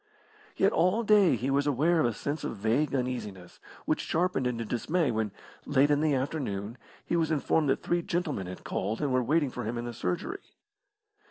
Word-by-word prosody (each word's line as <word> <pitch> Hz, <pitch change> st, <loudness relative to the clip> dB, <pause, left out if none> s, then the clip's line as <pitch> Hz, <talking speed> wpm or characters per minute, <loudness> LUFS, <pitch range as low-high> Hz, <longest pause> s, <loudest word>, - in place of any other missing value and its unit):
Yet 195 Hz, -, +4 dB
all 185 Hz, +7 st, +2 dB
day 205 Hz, -, +5 dB
he 130 Hz, +4 st, -2 dB
was 140 Hz, +1 st, +2 dB
aware 155 Hz, +5 st, +2 dB
of 155 Hz, -, +3 dB
a 120 Hz, -, -1 dB
sense 145 Hz, +6 st, -3 dB
of -, -, -3 dB
vague 120 Hz, +8 st, +1 dB
uneasiness, 105 Hz, -9 st, -4 dB, 0.3 s
which -, -, 0 dB
sharpened 160 Hz, -6 st, 0 dB
into 115 Hz, -2 st, -2 dB
dismay 150 Hz, +6 st, 0 dB
when, 110 Hz, -2 st, -1 dB, 0.4 s
late 145 Hz, +1 st, +3 dB
in 145 Hz, 0 st, +3 dB
the 155 Hz, -2 st, +2 dB
afternoon, 125 Hz, -6 st, -3 dB, 0.3 s
he -, -, -1 dB
was 165 Hz, -2 st, +1 dB
informed 155 Hz, -1 st, +1 dB
that -, -, 0 dB
three 175 Hz, 0 st, +1 dB
gentlemen 165 Hz, -, -2 dB
had 90 Hz, -, -8 dB
called 105 Hz, +4 st, -2 dB
and 140 Hz, -3 st, 0 dB
were 130 Hz, -, +3 dB
waiting 145 Hz, +2 st, +1 dB
for 125 Hz, -, -5 dB
him 115 Hz, +2 st, -3 dB
in 120 Hz, -, -3 dB
the 120 Hz, -, -5 dB
surgery. 90 Hz, -5 st, -3 dB
135 Hz, 195 wpm, -29 LUFS, 115-160 Hz, 0.4 s, day